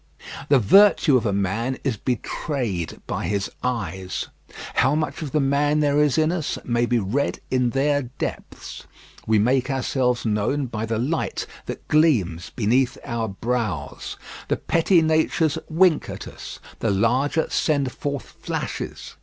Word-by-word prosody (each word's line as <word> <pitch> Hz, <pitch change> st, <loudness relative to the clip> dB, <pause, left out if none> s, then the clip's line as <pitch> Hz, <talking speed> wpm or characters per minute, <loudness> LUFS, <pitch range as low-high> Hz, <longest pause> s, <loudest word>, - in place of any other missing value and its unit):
The 140 Hz, -, +6 dB
virtue 155 Hz, -, +6 dB
of 120 Hz, -2 st, +2 dB
a -, -, +1 dB
man 110 Hz, +6 st, -1 dB
is 130 Hz, -5 st, 0 dB
betrayed 120 Hz, -, -3 dB
by -, -, -3 dB
his 100 Hz, +1 st, -1 dB
eyes. 95 Hz, -7 st, -3 dB, 0.4 s
How 135 Hz, +3 st, +3 dB
much 155 Hz, +1 st, -2 dB
of 150 Hz, -4 st, -4 dB
the 155 Hz, -, +2 dB
man 145 Hz, +2 st, +2 dB
there 145 Hz, 0 st, +3 dB
is 150 Hz, -1 st, +2 dB
in 155 Hz, +1 st, +3 dB
us 170 Hz, -4 st, -2 dB
may 120 Hz, 0 st, +1 dB
be 120 Hz, -, +2 dB
read 115 Hz, +7 st, -1 dB
in 125 Hz, -1 st, +2 dB
their 145 Hz, +3 st, +1 dB, 0.2 s
depths. -, -, -6 dB, 0.4 s
We 110 Hz, 0 st, +4 dB
make 125 Hz, +5 st, +2 dB
ourselves 130 Hz, -2 st, 0 dB
known 110 Hz, +7 st, 0 dB
by 115 Hz, -2 st, -4 dB
the 115 Hz, 0 st, -1 dB
light 145 Hz, +8 st, -1 dB, 0.2 s
that -, -, -7 dB
gleams 110 Hz, -, +2 dB
beneath 125 Hz, +3 st, +1 dB
our 115 Hz, -4 st, -2 dB
brows. 105 Hz, -7 st, -3 dB, 0.3 s
The -, -, 0 dB
petty 165 Hz, +1 st, +3 dB
natures 160 Hz, -1 st, +2 dB
wink 170 Hz, 0 st, +3 dB
at -, -, -7 dB
us, -, -, -9 dB, 0.2 s
the 115 Hz, -, 0 dB
larger 125 Hz, +10 st, +2 dB
send 140 Hz, -4 st, +1 dB
forth 140 Hz, 0 st, -4 dB, 0.2 s
flashes. -, -, -5 dB
130 Hz, 150 wpm, -23 LUFS, 110-145 Hz, 0.4 s, The